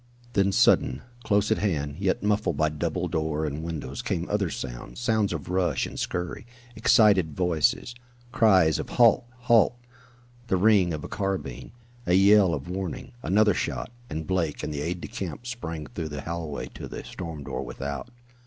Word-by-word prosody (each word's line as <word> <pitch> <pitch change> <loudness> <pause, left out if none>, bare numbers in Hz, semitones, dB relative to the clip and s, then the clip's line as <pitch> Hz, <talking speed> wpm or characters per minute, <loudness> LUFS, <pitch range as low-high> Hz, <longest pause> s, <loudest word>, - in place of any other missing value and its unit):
Then 100 0 +3
sudden, 65 -7 +3 0.2
close 105 0 +2
at 110 - +2
hand, 75 -8 -1
yet 95 0 0
muffled 105 +1 +1
by 75 -1 +2
double 85 +4 -2
door 80 -2 -1
and 75 +1 -3
windows, 80 -5 -5
came 85 +1 -2
other 100 -4 +1
sounds 60 - -6
sounds 110 -4 +1
of 80 -4 -4
rush 90 -1 +1
and - - -7
scurry, 90 +5 -3 0.3
excited 100 -8 +4
voices, 85 - +1 0.4
cries 95 -9 +4
of - - -5
halt! 120 0 +4 0.2
halt! 120 -1 +4 0.7
the 95 - +2
ring 100 -2 +4
of 75 -2 -4
a - - -5
carbine, 95 -11 -3 0.4
a 90 - +4
yell 100 -2 +6
of 70 +1 -7
warning 95 +5 -5
another 105 +1 +3
shot, 110 - -3 0.2
and 80 +1 -4
Blake 85 -5 -1
and 75 - -3
the 70 - -3
aide 85 +3 -3
de - - -5
camp 95 +5 -6
sprang 85 -11 -5
through 80 +1 -5
the 75 -2 -5
hallway 80 -2 -4
to - - -7
the - - -7
storm 80 -5 -7
door - - -4
without. 70 - -5
90 Hz, 170 wpm, -26 LUFS, 75-100 Hz, 0.7 s, yell